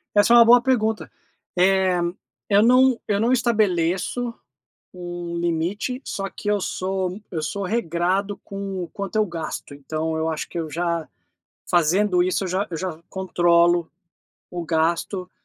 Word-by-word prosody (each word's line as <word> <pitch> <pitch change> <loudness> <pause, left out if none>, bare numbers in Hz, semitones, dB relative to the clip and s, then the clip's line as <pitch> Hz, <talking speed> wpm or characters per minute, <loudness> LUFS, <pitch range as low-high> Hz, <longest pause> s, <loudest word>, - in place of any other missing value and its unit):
Essa 205 +3 +5
é 240 - +9
uma 235 - +9
boa 245 +1 +7
pergunta, 220 -4 0 0.5
eh, 185 -1 +3 0.5
eu 200 0 +4
não 255 +1 +5
eu 200 -1 +1
não 230 +4 +2
estabeleço 215 -1 +1 0.6
um 175 -1 -6
limite 175 +9 -1
só 195 0 -4
que - - -9
eu 205 -1 +1
sou 185 0 -2
eu 160 - -2
sou 200 +6 -3
regrado 190 0 -1
com 195 -2 -5
o 170 - -8
quanto 200 0 -6
eu 215 - +3
gasto, 165 -5 -6
então 155 +3 -3
eu 160 0 -1
acho 155 - -3
que 170 - -4
eu 160 - -4
já, 170 0 -2 0.6
fazendo 180 +2 +3
isso 185 +2 0
eu 185 - -3
já 190 +3 -1
eu 165 - -3
já 180 -2 -4
controlo 175 -3 +2 0.6
o 175 -1 -4
gasto, 170 +3 -1
185 Hz, 155 wpm, -23 LUFS, 170-205 Hz, 0.6 s, é